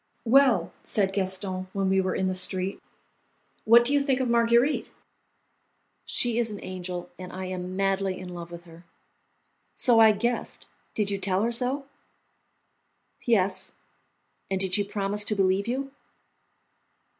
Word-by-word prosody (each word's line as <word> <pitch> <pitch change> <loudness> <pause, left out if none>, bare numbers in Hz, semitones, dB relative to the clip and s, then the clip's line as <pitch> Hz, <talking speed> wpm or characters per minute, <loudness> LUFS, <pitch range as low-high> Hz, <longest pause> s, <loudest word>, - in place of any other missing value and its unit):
"Well," 240 -7 +4
said 195 -2 0
Gaston, 190 -1 -2
when 195 -1 0
we 190 0 +3
were 185 0 -2
in 190 - 0
the 185 - 0
street, 185 +1 -3 0.8
"what 235 +1 +7
do 270 - +2
you 285 - +4
think 275 -2 +1
of 260 - 0
Marguerite?" 235 +4 +2 1.2
"She 240 -1 +1
is 235 -1 +1
an 205 -2 -6
angel, 180 -1 -6
and 180 0 -8
I 185 0 -6
am 185 0 -5
madly 195 -1 0
in 185 -1 -8
love 175 -1 -8
with 170 0 -10
her." 170 0 -15 0.9
"So 240 -3 +4
I 220 -1 +8
guessed; 235 +3 -2 0.3
did 205 -2 0
you 200 - -2
tell 195 +1 0
her 235 - +1
so?" 255 +4 -1 1.4
"Yes." 195 -5 +2 0.8
"And 190 -1 -1
did 190 -1 -2
she 205 - +3
promise 205 0 -1
to 210 - -1
believe 195 +1 +1
you?" 270 +3 -3
195 Hz, 150 wpm, -26 LUFS, 185-235 Hz, 1.4 s, I